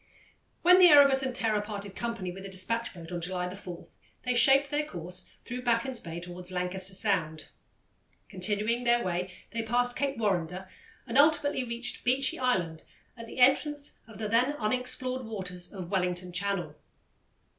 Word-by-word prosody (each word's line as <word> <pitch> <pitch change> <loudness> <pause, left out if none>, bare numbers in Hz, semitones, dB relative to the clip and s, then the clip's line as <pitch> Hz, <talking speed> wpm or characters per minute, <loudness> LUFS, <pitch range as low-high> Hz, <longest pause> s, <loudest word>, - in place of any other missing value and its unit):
When 360 +1 +7
the 365 - +9
Erebus 280 -4 +7
and 260 -2 -3
Terror 220 -4 +1
parted 205 -2 -7
company 230 -6 -4
with 190 +2 -9
the 195 - -8
despatch 230 +5 0
boat 170 -2 -11
on 175 -1 -4
July 180 +1 -2
4, 180 -3 -9 0.4
they 250 - 0
shaped 275 +3 +5
their 295 +1 +1
course 180 - -8 0.2
through 250 +1 -5
Baffin's 240 +1 0
Bay 165 0 -7
towards 180 +1 -6
Lancaster 185 +1 -3
Sound. 165 -7 0 0.8
Continuing 210 +5 0
their 240 0 +3
way, 180 0 -2 0.2
they 230 - -2
passed 245 +2 0
Cape 275 0 -1
Warrender 185 -3 -1 0.4
and 270 - +1
ultimately 290 -2 +3
reached 240 0 -3
Beechy 260 +2 +1
Island 180 -11 0 0.3
at 230 -1 -10
the - - -10
entrance 285 +3 +2
of 220 -3 -12
the 220 - -3
then 240 +6 +2
unexplored 255 +1 0
waters 185 -5 -5
of 185 -4 -8
Wellington 180 -1 -1
Channel. 180 -4 -2
215 Hz, 160 wpm, -29 LUFS, 180-250 Hz, 0.8 s, the